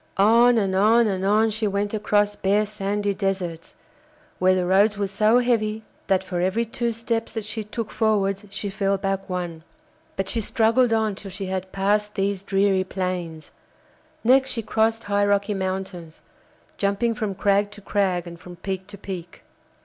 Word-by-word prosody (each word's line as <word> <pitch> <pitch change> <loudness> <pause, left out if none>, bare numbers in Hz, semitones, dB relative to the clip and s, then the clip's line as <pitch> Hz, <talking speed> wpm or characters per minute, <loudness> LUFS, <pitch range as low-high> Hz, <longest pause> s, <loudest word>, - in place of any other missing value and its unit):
On 230 +4 +5
and 195 -3 +1
on 225 +4 +5
and 190 -3 -1
on 215 +3 +3
she 220 0 -1
went 200 +1 -1
across 205 -1 +1
bare 205 +2 +1
sandy 205 0 -2
deserts, 185 -4 -3 0.6
where 185 0 +4
the 180 -1 0
roads 200 +3 +3
were 205 - 0
so 215 +4 +3
heavy 220 -3 +1 0.2
that 190 -1 +2
for 180 -2 -3
every 190 +6 +1
two 235 +1 -2
steps 230 0 -3
that 225 -2 -4
she 215 +1 -3
took 215 +1 -5
forwards 200 -3 +1
she 200 0 -4
fell 195 -1 0
back 195 0 -3
one; 175 -3 -4 0.5
but 195 - -2
she 225 +4 0
struggled 230 +3 +2
on 220 -2 +1
till 195 0 -8
she 195 +1 -5
had 185 0 -4
passed 210 +2 0
these 195 -1 -1
dreary 195 -1 +2
plains; 180 -4 -4 0.7
next 265 +3 +4
she 230 -3 -3
crossed 225 +1 +1
high 205 0 +1
rocky 205 +1 +1
mountains, 190 -4 -5 0.6
jumping 200 +4 +1
from 215 -4 -3
crag 200 +1 +2
to 205 0 -10
crag 195 -3 0
and 170 -1 -10
from 180 0 -11
peak 190 +1 -5
to 205 -1 -10
peak. 185 -3 -8
200 Hz, 170 wpm, -23 LUFS, 190-215 Hz, 0.7 s, On